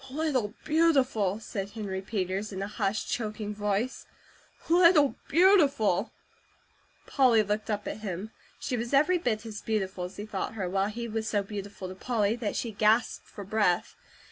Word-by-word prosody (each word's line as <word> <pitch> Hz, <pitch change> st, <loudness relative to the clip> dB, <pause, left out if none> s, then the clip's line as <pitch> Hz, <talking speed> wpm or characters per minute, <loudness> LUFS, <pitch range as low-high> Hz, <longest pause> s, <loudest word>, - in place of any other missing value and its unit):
"Little 260 Hz, -7 st, -1 dB
Beautiful!" 270 Hz, -, +2 dB
said 200 Hz, -3 st, -5 dB
Henry 200 Hz, -3 st, -4 dB
Peters 195 Hz, 0 st, -3 dB
in 190 Hz, 0 st, -4 dB
a -, -, -3 dB
hushed, 210 Hz, 0 st, -2 dB
choking 215 Hz, -2 st, -3 dB
voice, 210 Hz, +4 st, -2 dB, 0.6 s
"Little 335 Hz, -4 st, +5 dB
Beautiful!" 280 Hz, -, +4 dB, 0.9 s
Polly 245 Hz, -6 st, +4 dB
looked 210 Hz, +2 st, -2 dB
up 205 Hz, -1 st, -2 dB
at -, -, -4 dB
him. 205 Hz, 0 st, -5 dB, 0.3 s
She 250 Hz, -, -2 dB
was 235 Hz, +3 st, -1 dB
every 345 Hz, +6 st, +4 dB
bit 230 Hz, -8 st, -1 dB
as 215 Hz, -2 st, -7 dB
beautiful 190 Hz, -4 st, -2 dB
as 180 Hz, -, -9 dB
he 205 Hz, -, -5 dB
thought 210 Hz, 0 st, -4 dB
her, 195 Hz, -4 st, -2 dB
while 195 Hz, +2 st, 0 dB
he 235 Hz, +2 st, -5 dB
was 220 Hz, 0 st, -3 dB
so 205 Hz, -2 st, +1 dB
beautiful 200 Hz, -1 st, -7 dB
to 185 Hz, -, -7 dB
Polly 215 Hz, +1 st, 0 dB
that 225 Hz, -4 st, -3 dB
she 235 Hz, -, -2 dB
gasped 215 Hz, +3 st, +2 dB
for 205 Hz, -, -9 dB
breath. 200 Hz, -3 st, +1 dB
215 Hz, 165 wpm, -28 LUFS, 200-245 Hz, 0.9 s, Little